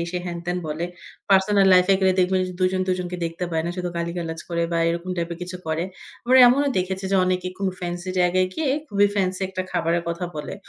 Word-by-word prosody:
সে 180 Hz, -, -2 dB
হ্যান-ত্যান 175 Hz, +1 st, -3 dB
বলে। 155 Hz, +3 st, -3 dB, 0.5 s
Personal 195 Hz, +1 st, +4 dB
life 180 Hz, 0 st, +6 dB
এ -, -, +6 dB
গেলে 190 Hz, -1 st, +4 dB
দেখবেন 185 Hz, +1 st, +2 dB
যে -, -, -6 dB
দুজন 185 Hz, 0 st, +2 dB
দুজনকে 180 Hz, -1 st, -2 dB
দেখতে 165 Hz, +2 st, -3 dB
পায় 160 Hz, -1 st, 0 dB
না 175 Hz, -, -1 dB
শুধু 180 Hz, -1 st, -2 dB
গালিগালাজ 170 Hz, -1 st, -3 dB
করে 170 Hz, -1 st, -1 dB
বা 170 Hz, -, +1 dB
এরকম 170 Hz, +2 st, -3 dB
টাইপ 170 Hz, 0 st, -2 dB
এর 170 Hz, -, -7 dB
কিছু 180 Hz, +1 st, -6 dB
করে। 160 Hz, +2 st, -1 dB, 0.4 s
আবার 255 Hz, +2 st, +4 dB
এমনও 280 Hz, +4 st, +4 dB
দেখেছি 190 Hz, +1 st, -3 dB
যে, 195 Hz, -, +3 dB
অনেকে 185 Hz, 0 st, -1 dB
খুব 200 Hz, -, -3 dB, 0.2 s
ফেন্সি 175 Hz, +1 st, -4 dB
জায়গায় 185 Hz, +1 st, +3 dB
গিয়ে 300 Hz, -4 st, 0 dB, 0.2 s
খুবই 205 Hz, -2 st, +3 dB
ফেন্সি 185 Hz, -2 st, 0 dB
একটা 185 Hz, -1 st, -3 dB
খাবারের 170 Hz, 0 st, 0 dB
কথা 170 Hz, +2 st, -3 dB
বলে 150 Hz, -, -5 dB
180 Hz, 215 wpm, -23 LUFS, 170-190 Hz, 0.5 s, life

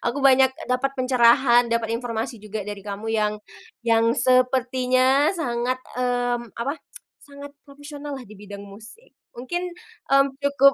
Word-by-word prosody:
Aku 255 Hz, +4 st, -1 dB
banyak 265 Hz, -1 st, +6 dB, 0.2 s
dapat 255 Hz, +2 st, +1 dB
pencerahan, 245 Hz, -1 st, +4 dB
dapat 230 Hz, -1 st, -1 dB
informasi 230 Hz, 0 st, -3 dB
juga 210 Hz, 0 st, -6 dB
dari 205 Hz, 0 st, -6 dB
kamu 205 Hz, +2 st, -6 dB
yang 210 Hz, -1 st, +1 dB, 0.5 s
yang 230 Hz, 0 st, +3 dB
sepertinya 255 Hz, +2 st, +2 dB
sangat, 245 Hz, -6 st, -1 dB, 0.2 s
mmm, 245 Hz, -2 st, -1 dB
apa, 275 Hz, +7 st, -3 dB, 0.5 s
sangat 285 Hz, 0 st, -11 dB, 0.2 s
profesional 290 Hz, 0 st, -8 dB
lah 265 Hz, -, -7 dB
di 215 Hz, -3 st, -14 dB
bidang 200 Hz, 0 st, -10 dB
musik. 215 Hz, -, -14 dB, 0.2 s
Mungkin, 305 Hz, +9 st, -4 dB, 0.5 s
mmm, 275 Hz, 0 st, +5 dB
cukup 280 Hz, -1 st, +4 dB
250 Hz, 135 wpm, -23 LUFS, 230-275 Hz, 0.5 s, banyak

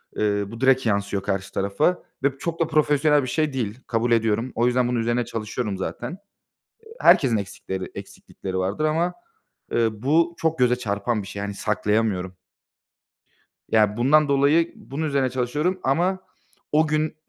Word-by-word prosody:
eee, 105 Hz, -1 st, +1 dB
bu 115 Hz, +3 st, -10 dB
direkt 130 Hz, -1 st, +4 dB
yansıyor 100 Hz, -2 st, 0 dB
karşı 100 Hz, -1 st, -2 dB
tarafa 100 Hz, -, 0 dB, 0.2 s
ve 140 Hz, 0 st, +1 dB
çok 170 Hz, -1 st, -4 dB
da 165 Hz, -, +2 dB
profesyonel 150 Hz, -1 st, +3 dB
bir -, -, -4 dB
şey 155 Hz, +2 st, 0 dB
değil. 115 Hz, -2 st, -3 dB
Kabul 115 Hz, +1 st, 0 dB
ediyorum. 115 Hz, +1 st, +1 dB
O 120 Hz, -, +2 dB
yüzden 125 Hz, 0 st, +2 dB
bunun 120 Hz, -1 st, 0 dB
üzerine 120 Hz, +1 st, 0 dB
çalışıyorum 110 Hz, -2 st, -4 dB
zaten. 160 Hz, -, -5 dB, 0.7 s
Eee, 450 Hz, -, -13 dB
herkesin 125 Hz, -6 st, +5 dB
eksikleri, 95 Hz, -2 st, -5 dB
eksiklikleri 95 Hz, -1 st, -7 dB
vardır 95 Hz, +10 st, -1 dB
ama, 165 Hz, +3 st, +1 dB, 0.6 s
ııı, 110 Hz, -2 st, 0 dB
bu 165 Hz, +5 st, +2 dB
çok 160 Hz, 0 st, 0 dB
göze 125 Hz, -1 st, +3 dB
çarpan 105 Hz, -1 st, -2 dB
bir -, -, -10 dB
şey. 100 Hz, 0 st, -6 dB
Yani, 100 Hz, 0 st, -4 dB
saklayamıyorum. 100 Hz, -3 st, -1 dB, 1.4 s
Ya, 105 Hz, -1 st, +3 dB
bundan 145 Hz, +5 st, +4 dB
dolayı 145 Hz, +4 st, +3 dB
bunun 145 Hz, +4 st, -5 dB
üzerine 140 Hz, -3 st, +1 dB
çalışıyorum 145 Hz, +9 st, -1 dB
ama 175 Hz, +8 st, +1 dB, 0.5 s
o 155 Hz, +1 st, +3 dB
gün, 155 Hz, 0 st, 0 dB
125 Hz, 155 wpm, -23 LUFS, 105-150 Hz, 1.4 s, herkesin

